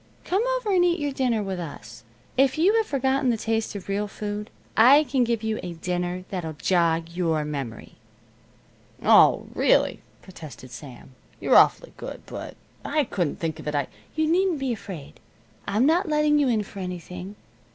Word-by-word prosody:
Come 380 +3 +1 0.2
over 455 -5 -3
and 365 -2 +4
eat 350 0 +2
your 290 -1 -1
dinner 250 -5 0
with 190 -2 -4
us. 115 -9 -9 0.3
If 270 +2 +3
you 360 +7 +4
have 445 - +1
forgotten 270 -1 +1
the 235 - +1
taste 225 0 -2
of 195 - -7
real 200 +1 -1
food, 210 +1 -5 0.3
I 270 +7 +7
can 260 -2 +1
give 230 -2 -1
you 220 0 -1
a 175 - -6
dinner 180 +1 -3
that'll 170 -5 -4
jog 165 0 +1
your 165 -3 -1
memory." 140 -6 -6 1.1
"Oh, - - +6
really," - - +2 0.2
protested 155 -8 -11
Sam. 130 -1 -11 0.3
"You're - - +2
awfully - - +5
good, - - -8
but - - -8 0.3
I 305 - +1
couldn't 180 - -2
think 160 -1 -3
of 155 - -9
it. 150 - -2
I 145 -2 -1
" - - -31
"You 315 0 +1
needn't 355 +1 +2
be 270 -3 -1
afraid. 180 -9 -9 0.5
I'm 215 +6 +2
not 335 +4 +2
letting 300 -1 +3
you 285 - +3
in 225 -4 +1
for 200 - -11
anything. 180 +1 -6
210 Hz, 180 wpm, -25 LUFS, 170-275 Hz, 1.1 s, I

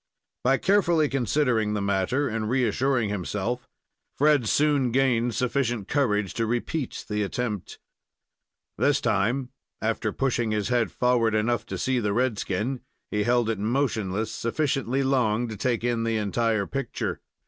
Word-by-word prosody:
By 135 +2 +4
carefully 175 -6 +3
considering 120 -4 +1
the - - 0
matter 100 +8 +1
and 110 -2 -2
reassuring 125 -1 +1
himself, 105 +5 -3 0.5
Fred 145 -6 +3
soon 145 -4 +2
gained 120 -3 +2
sufficient 120 -4 0
courage 105 -9 +1
to 115 -1 -1
repeat 120 +4 -3
the 105 0 -1
attempt. 105 -1 -3 1.0
This - - +3
time, 120 +6 0 0.3
after - - -1
pushing 120 -4 0
his 105 0 -1
head 120 -4 +1
forward 120 -3 +2
enough 115 +2 0
to - - -4
see 130 -1 0
the 105 -3 0
red 120 -2 +1
skin, 115 +7 -2 0.3
he 105 0 0
held 120 -1 +2
it 110 -3 -1
motionless 110 -3 -1
sufficiently 135 +2 -1
long 120 -4 +1
to 110 - -5
take 120 +2 -1
in 120 -2 0
the 115 -1 0
entire 110 0 0
picture. 135 +1 -3
120 Hz, 145 wpm, -26 LUFS, 110-130 Hz, 1.0 s, By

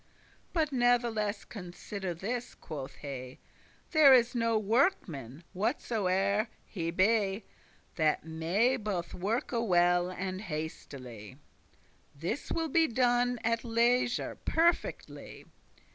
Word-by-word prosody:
But 315 -4 0
natheless 240 -4 +1
consider 185 -1 -6
this," 240 +8 -4
quoth 140 -4 -7
he, 130 -3 -7 0.5
"There 295 -5 +8
is 245 -1 +3
no 230 -2 +1
workman, 195 - 0
whatsoe'er 200 +1 0 0.2
he 165 -5 -4
be, 195 +2 +2 0.5
That 155 -1 +1
may 175 +11 +1
both 205 -6 -3
worke 210 +7 -2
well 180 -5 +3
and 185 +1 -4
hastily: 135 - -7 0.8
This 175 - -4
will 325 -1 -1
be 325 +3 +4
done 245 -1 +2
at 230 0 0
leisure 240 +1 +1
perfectly. 340 +1 -1
205 Hz, 100 wpm, -31 LUFS, 175-240 Hz, 0.8 s, There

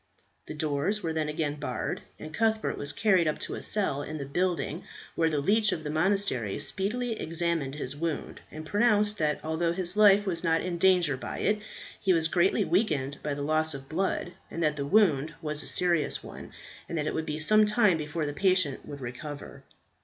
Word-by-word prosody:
The 155 - -6
doors 155 +7 -1
were 165 -1 -2
then 155 -1 -1
again 150 -1 -2
barred, - - -3 0.2
and 155 - -9
Cuthbert 220 +2 0
was 145 - -2
carried 185 0 +2
up 155 - 0
to - - -4
a - - -5
cell 190 -10 0
in 155 +2 -6
the 140 - -5
building, 170 +1 -2 0.3
where 165 -1 +1
the 150 -2 0
leech 210 +7 +2
of 160 -4 -3
the 150 - -4
monastery 160 - 0
speedily 225 +4 -1
examined 165 -4 -1
his 140 -2 -5
wound, 160 0 -4
and 155 0 -9
pronounced, 210 +2 +2
that 150 -1 +1
although 160 +2 0
his 180 0 +1
life 205 -1 +6
was 175 -3 -1
not 165 -1 +2
in 175 -2 -4
danger 180 -6 +4
by 130 - -6
it, 210 +1 +1 0.4
he 190 - +2
was 165 -1 +1
greatly 175 +3 +2
weakened 150 -7 0
by 150 -1 -2
the 145 - -4
loss 155 0 +1
of 135 -1 -9
blood, 175 +2 -2 0.2
that 155 -3 0
the 140 -1 -3
wound 160 -5 +3
was 150 -2 0
a 135 - -2
serious 170 +2 +2
one, - - -10 0.4
and 170 - -3
that 150 - -1
it - - -2
would 160 0 -3
be 150 - -3
some 215 +7 +5
time 210 -4 +4
before 150 +1 -3
the 145 - -3
patient 185 -5 +1
would 140 -1 -8
recover. 140 +4 -8
160 Hz, 200 wpm, -28 LUFS, 150-190 Hz, 0.4 s, life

